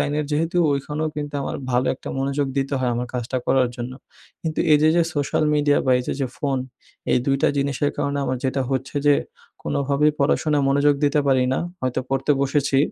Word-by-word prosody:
লাইনের 150 +1 0
যেহেতু 165 +4 0 0.2
ওইখানেও 150 +3 -2
কিন্তু 145 -1 -4
আমার - - -3
ভালো 125 +1 +1
একটা - - -10
মনোযোগ 140 +1 0
দিতে 135 +1 -1
হয় 125 -1 0
আমার 125 +1 -2
কাজটা 125 +1 -2
করার 130 -2 +3
জন্য। 120 +1 -5 0.5
কিন্তু 160 -1 -2
এইযে 150 +1 +5
যে 170 - +5
সোশ্যাল 145 +1 0
মিডিয়া 145 -1 +3
বা - - +3
এইযে 125 - -3
যে 135 - +1
ফোন, 135 -2 0 0.5
এই - - +4
২ 135 -1 +3
টা - - +5
জিনিসের 140 +1 0
কারণে 140 0 -1
আমার 130 - -1
যেটা 130 0 0
হচ্ছে 135 +1 -3
যে 145 - +7 0.5
কোনোভাবেই 140 +2 +1
পড়াশোনায় 145 +1 +2
মনোযোগ 145 +1 +3
দিতে 145 +1 +3
পারি 130 -1 +3
না। - - 0 0.2
হয়তো 130 0 -1
পড়তে 135 +2 -1
বসেছি, 140 0 +1
140 Hz, 190 wpm, -22 LUFS, 130-145 Hz, 0.5 s, যে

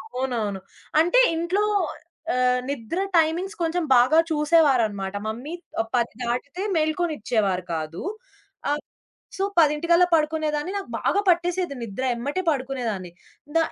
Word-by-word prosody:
అవునవును. 230 -7 -2 0.4
అంటే 355 +10 +4 0.2
ఇంట్లో 350 +5 0 0.7
ఆహ్, 250 0 +2
నిద్ర 280 - -3 0.2
టైమింగ్స్ 340 +5 +1
కొంచెం 330 +2 0
బాగా 255 +7 +5
చూసేవారన్నమాట 260 - +2
మమ్మీ 245 +9 -5 0.4
10 235 -2 0
దాటితే 250 +9 -3
మెలుకోనిచ్చేవారు 295 - 0
కాదు. 160 +1 -4 0.7
ఆహ్, 295 +1 0 0.6
సో, 385 - 0
పదింటికల్లా 335 +3 +4
పడుకునేదాన్ని 310 +1 0
నాకు 395 - -4
బాగా 405 - +2
పట్టేసేది 350 -2 +1
నిద్ర 230 +4 -4
ఎమ్మటే 285 +10 -2
పడుకునేదాన్ని. 250 - -2 0.5
ద - - +7
295 Hz, 110 wpm, -24 LUFS, 235-335 Hz, 0.7 s, ద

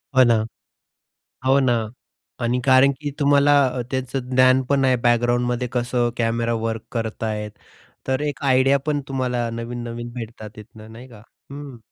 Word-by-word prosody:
हो 130 - +7
ना. 115 -3 +3 1.0
हो 135 +1 +5
ना 130 -2 +2 0.7
आणि 125 +2 0
कारण 135 +1 +5
की 145 -1 -3
तुम्हाला 145 0 +4
अ, 125 0 -3
त्याच 130 -1 -4
ज्ञानपण 130 +1 +3
आहे 130 -1 +3
बॅकग्राऊंडमध्ये 120 +1 +1
कसं 120 0 0
कॅमेरा 115 0 0
वर्क 115 -1 -2
करतायेत, 110 -2 -3 0.6
तर 130 0 0
एक 150 0 -3
आयडिया 135 +1 +4
पण 150 -1 0
तुम्हाला 125 -3 -1
नवीन-नवीन 120 0 -6
भेटतात 115 -3 -8
तिथनं, 110 0 -13
नाही 120 +3 -12
का? 110 -4 -15 0.3
हं. 140 -3 -9
125 Hz, 140 wpm, -22 LUFS, 115-130 Hz, 1.0 s, हो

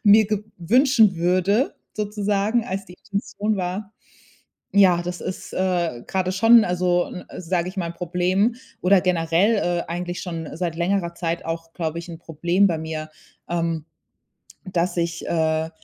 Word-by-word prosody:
mir 210 0 +6
ge 210 0 -2
wünschen 225 - +4
würde 185 - +2 0.2
sozusagen, 210 +2 0
als 195 +1 -4
die 180 - -12
Intention 205 +1 -2
war, 195 +3 -4 0.8
ja 185 -4 +5
das 180 0 -5
ist, 185 - -6
äh, 175 -9 0
gerade 185 -1 -1
schon, 225 +5 +7
n 220 - +4
also 180 0 +1
n 180 - -8 0.2
sage 175 0 -1
ich 185 - -9
mal, 175 - -1
'n 170 - -10
Problem 180 +6 +1 0.3
oder 185 +1 +5
generell, 180 +4 +2
äh, 175 -3 0
eigentlich 175 +1 -4
schon 165 -3 -5
seit 170 -2 -2
längerer 175 0 0
Zeit 170 -1 -3
auch, 165 0 -5
glaube 165 -1 -3
ich, 170 - -8
'n 165 -1 -8
Problem 170 +4 +1
bei 165 -3 -1
mir, 155 -1 -5 0.4
ähm, 165 -2 -1 0.8
dass 180 -2 -1
ich, 170 0 -2
äh 160 -1 +1
180 Hz, 160 wpm, -23 LUFS, 170-200 Hz, 0.8 s, schon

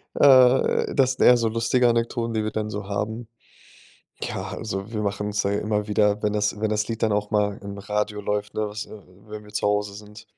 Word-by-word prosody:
äh, 130 -2 +5
das 130 -1 +3
sind - - +2
eher 125 - +8
so 115 -1 +1
lustige 115 +2 +2
Anekdoten, 115 0 -1
die 110 -1 0
wir 110 - -2
dann 110 0 -3
so 100 -1 -6
haben. 110 +3 -3 0.9
Ja, - - -4
also 105 0 -5
wir 105 -1 -2
machen 105 0 -2
uns 105 0 -1
da 100 - 0
immer 105 0 -1
wieder, 105 0 +2
wenn 105 - +1
das 105 0 -1
wenn 110 -1 0
das 105 0 0
Lied 115 -1 -4
dann 110 -2 +2
auch 105 0 -1
mal 105 -2 0
im 100 0 -7
Radio 105 +1 -2
läuft, 105 0 -3
ne, 110 -1 -1
was 105 +1 -6
äh, - - -18 0.4
wenn 105 0 -8
wir 105 - -15
zu 105 - -1
Hause 105 0 0
sind 105 +1 -12
105 Hz, 225 wpm, -24 LUFS, 105-110 Hz, 0.9 s, eher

